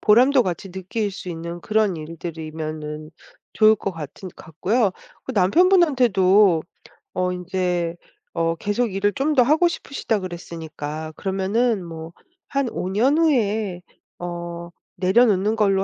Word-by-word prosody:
보람도 250 Hz, +5 st, +5 dB
같이 185 Hz, 0 st, -4 dB
느낄 190 Hz, +3 st, -3 dB
수 185 Hz, -, -8 dB
있는 170 Hz, +1 st, -6 dB
그런 215 Hz, -2 st, +1 dB
일들이면은 155 Hz, -1 st, -6 dB, 0.4 s
좋을 215 Hz, 0 st, +5 dB
것 195 Hz, -, -3 dB
같은 165 Hz, +4 st, -8 dB
같고요. 195 Hz, +8 st, 0 dB, 0.3 s
그 -, -, -5 dB
남편분한테도 210 Hz, -, +4 dB, 0.5 s
어 180 Hz, 0 st, 0 dB
인제 180 Hz, -2 st, -2 dB, 0.4 s
어 165 Hz, 0 st, 0 dB
계속 205 Hz, +4 st, -1 dB
일을 205 Hz, +1 st, +1 dB
좀 295 Hz, +3 st, 0 dB
더 265 Hz, -, +5 dB
하고 310 Hz, +7 st, +4 dB
싶으시다 275 Hz, -9 st, -2 dB
그랬으니까 160 Hz, -4 st, -6 dB
그러면은 195 Hz, +4 st, 0 dB
뭐 165 Hz, -1 st, -8 dB, 0.4 s
한 275 Hz, -3 st, 0 dB
5 180 Hz, -, -4 dB
년 250 Hz, +10 st, +2 dB
후에 215 Hz, -, +1 dB, 0.4 s
어 170 Hz, -1 st, -6 dB, 0.3 s
"내려놓는 205 Hz, +2 st, +3 dB
걸로 195 Hz, -2 st, +3 dB
190 Hz, 260 characters per minute, -22 LUFS, 170-220 Hz, 0.5 s, 보람도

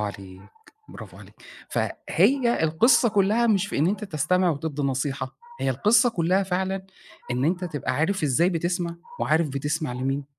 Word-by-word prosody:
عليك، 100 Hz, -3 st, -7 dB, 0.5 s
برافو -, -, -11 dB
عليك. -, -, -15 dB, 0.3 s
فهي 250 Hz, -8 st, +1 dB
القصّة 235 Hz, +10 st, +4 dB
كُلها 210 Hz, +3 st, +2 dB
مش 205 Hz, -3 st, +2 dB
في 205 Hz, -, -4 dB
إن 150 Hz, -, +3 dB
أنت 210 Hz, +2 st, -1 dB
تستمع 180 Hz, +1 st, +1 dB
وتدّي 150 Hz, -1 st, -3 dB
نصيحة، 135 Hz, 0 st, -2 dB, 0.2 s
هي -, -, +1 dB
القصّة 235 Hz, +4 st, +3 dB
كُلها 185 Hz, 0 st, +1 dB
فعلًا 190 Hz, +1 st, -2 dB, 0.4 s
إن 125 Hz, +2 st, 0 dB
أنت 180 Hz, +4 st, 0 dB
تبقى 145 Hz, -6 st, -3 dB
عارف 190 Hz, +6 st, 0 dB
إزاي 150 Hz, +4 st, +3 dB
بتسمع 170 Hz, 0 st, -2 dB, 0.2 s
وعارف 155 Hz, +1 st, +2 dB
بتسمع 145 Hz, +1 st, -2 dB
مين 135 Hz, +3 st, -2 dB
170 Hz, 150 wpm, -24 LUFS, 145-195 Hz, 0.5 s, القصّة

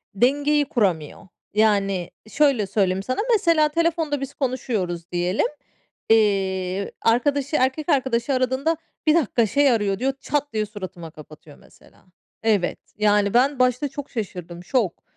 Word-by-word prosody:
dengeyi 290 Hz, +6 st, +2 dB
kuramıyor. 195 Hz, -, -1 dB, 0.3 s
Yani, 200 Hz, -4 st, +1 dB, 0.2 s
şöyle 275 Hz, -6 st, +2 dB
söyleyeyim 190 Hz, -1 st, 0 dB
sana, 255 Hz, +4 st, -3 dB
mesela, 335 Hz, -7 st, +3 dB
telefonda 325 Hz, -2 st, 0 dB
biz 275 Hz, 0 st, -5 dB
konuşuyoruz 215 Hz, -, -3 dB
diyelim, 180 Hz, +3 st, 0 dB, 0.6 s
eee, 195 Hz, -3 st, +1 dB
arkadaşı, 280 Hz, +5 st, +1 dB
erkek 265 Hz, +4 st, 0 dB
arkadaşı 260 Hz, -1 st, +1 dB
aradığında, 260 Hz, +5 st, 0 dB, 0.3 s
"Bir 310 Hz, -, +5 dB
dakika, 245 Hz, -7 st, +2 dB
şey 280 Hz, +6 st, +3 dB
arıyor." 205 Hz, -4 st, 0 dB
diyor, 270 Hz, +2 st, 0 dB
çat 290 Hz, -2 st, -2 dB
diye 215 Hz, -1 st, 0 dB
suratıma 185 Hz, -5 st, -8 dB
kapatıyor, 155 Hz, -1 st, -14 dB
mesela. -, -, -22 dB, 0.4 s
Evet, 210 Hz, -5 st, +1 dB, 0.2 s
yani, 205 Hz, -1 st, +2 dB
ben 260 Hz, +3 st, +3 dB
başta 255 Hz, +2 st, +2 dB
çok 280 Hz, +1 st, -8 dB
şaşırdım, 180 Hz, -6 st, -6 dB
şok. 210 Hz, -2 st, -1 dB
230 Hz, 130 wpm, -23 LUFS, 195-280 Hz, 0.6 s, Bir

